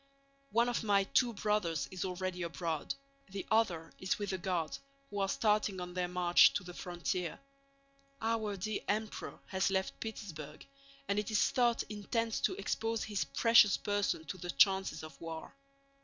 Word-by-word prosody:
One 235 0 +3
of 245 -1 -1
my 200 -2 +4
two 240 +4 +2
brothers 180 -9 0
is 185 -1 -3
already 185 0 -3
abroad, 170 -2 -2 0.3
the 195 0 -5
other 180 -8 +1
is 185 - 0
with 205 -2 -3
the 190 - -2
Guards, 175 -3 -2 0.3
who 205 - -3
are 195 -1 +1
starting 210 -3 +2
on 180 0 -6
their 180 0 0
march 175 -1 +5
to 205 - 0
the 175 -1 -9
frontier. 175 -1 -3 0.8
Our 220 -2 -1
dear 210 +3 -2
Emperor 215 +1 -2
has 190 0 +1
left 190 0 -1
Petersburg 155 -9 -7 0.4
and 200 +1 +1
it 210 - -3
is 215 - +3
thought 240 -3 +2
intends 220 +2 -2
to - - +1
expose 225 +3 -1
his 205 -2 -1
precious 230 -3 +6
person 205 -6 0
to 185 - -6
the 175 - -6
chances 190 +3 +3
of 155 -3 -11
war. 165 -1 -6
195 Hz, 165 wpm, -34 LUFS, 175-215 Hz, 0.8 s, precious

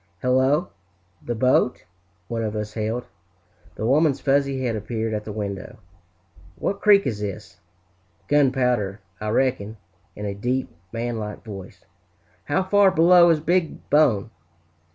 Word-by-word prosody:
"Hello, 130 +7 +2 0.5
the 120 - -3
boat!" 125 +1 +2 0.4
one 115 -1 -3
of 110 -1 -3
us 105 0 -4
hailed. 110 +2 -3 0.7
The 110 - -4
woman's 140 +2 +3
fuzzy 140 -1 +1
head 120 -3 -1
appeared 110 +1 -3
at 105 -1 -3
the 110 - -5
window. 100 -2 -5 0.8
"What 200 - -3
creek 205 -2 +5
is 110 -6 -2
this?" 100 -2 -6 0.7
"Gunpowder, 125 -8 +1 0.2
I 105 - -3
reck'n!" 115 -3 0 0.4
in 105 - -6
a 100 - -2
deep, 125 +6 -2 0.2
man 115 0 -3
like 105 +1 -7
voice. 95 -3 -10 0.6
"How 165 +6 +1
far 200 +1 +4
below 175 0 +6
is 165 -2 +3
Big 175 +1 -1
Bone?" 120 -8 +3
120 Hz, 135 wpm, -23 LUFS, 105-145 Hz, 0.8 s, below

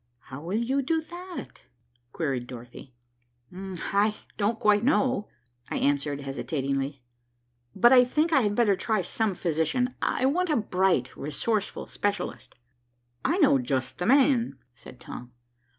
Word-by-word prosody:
"How 135 - -6
will 180 +6 -2
you 260 +4 +1
do 320 +5 +1
that?" 350 +3 -9 0.5
queried 135 -6 -2
Dorothy. 125 +1 -11 0.6
"I 195 +3 -1 0.2
don't 215 +2 0
quite 210 0 +4
know," 260 -4 +2 0.4
I - - -2
answered 145 0 0
hesitatingly. 135 -1 -3 0.7
"But 240 +6 +6
I 250 -1 +8
think 305 +6 +1
I 270 - +6
had 205 -2 0
better 210 -4 +4
try 215 0 0
some 210 +2 -1
physician. 180 +11 0
I - - +1
want 350 +6 +1
a 305 - +3
bright, 185 - +1
resourceful 205 +9 -2
specialist." 205 -2 -3 0.7
"I 345 - +1
know 285 - +5
just 130 0 -2
the 180 - -1
man," 260 -2 +4 0.2
said 120 - -13
Tom. 125 -1 -9
205 Hz, 135 wpm, -27 LUFS, -, 0.7 s, I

